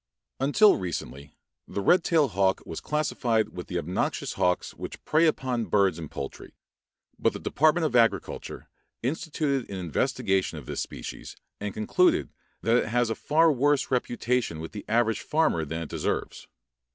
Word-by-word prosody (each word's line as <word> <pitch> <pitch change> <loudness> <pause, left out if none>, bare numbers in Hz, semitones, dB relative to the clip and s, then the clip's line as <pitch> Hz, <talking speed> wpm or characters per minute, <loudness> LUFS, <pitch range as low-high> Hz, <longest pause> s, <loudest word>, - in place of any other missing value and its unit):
Until 145 +11 +5
recently 70 -6 -6 0.3
the - - -4
red 175 - +4
tailed 155 -8 +3
hawk 95 0 +1
was 80 - -6
classified 120 -7 0
with 90 -1 -8
the 90 - -3
obnoxious 85 +2 -2
hawks 90 0 0
which - - -8
prey 160 +2 +4
upon 130 -6 0
birds 95 -6 +2
and 80 -3 -7
poultry, 70 - -7 0.6
but - - +2
the - - -6
Department 155 +2 +2
of 145 - -1
Agriculture 115 -2 0 0.4
instituted 145 -1 -1
an 100 - -5
investigation 95 - 0
of - - -9
this - - -3
species - - -7 0.2
and 105 0 -3
concluded 110 - +2 0.3
that 115 +1 +4
it - - 0
has 120 0 +1
a - - +2
far 160 +7 +3
worse 145 +1 +1
reputation 120 -7 0
with 80 0 -6
the 105 - -8
average 115 0 +1
farmer 150 - +1
than 80 +3 -4
it 80 - -9
deserves. - - -3
115 Hz, 160 wpm, -27 LUFS, 95-145 Hz, 0.6 s, Until